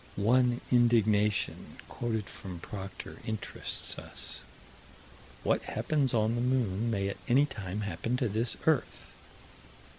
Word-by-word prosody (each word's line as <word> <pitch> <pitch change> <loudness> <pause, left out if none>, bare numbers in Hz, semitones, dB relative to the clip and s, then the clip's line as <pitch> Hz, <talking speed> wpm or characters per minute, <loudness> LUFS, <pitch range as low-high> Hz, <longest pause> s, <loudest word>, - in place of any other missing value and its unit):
One 120 +4 +3
indignation 110 -4 +3
quoted 110 -3 -2
from 90 -4 -6
Proctor 95 +2 -7
interests 110 -2 -3
us: - - -5 1.0
"What - - +2
happens 145 -5 +1
on 110 0 +2
the 120 - 0
moon 120 -4 +1
may 100 -3 0
at 100 - -3
any 135 +4 +5
time 105 -7 -5
happen 100 +5 -1
to 125 - +1
this 110 +3 0
earth." 155 -7 +1
115 Hz, 120 wpm, -31 LUFS, 100-125 Hz, 1.0 s, any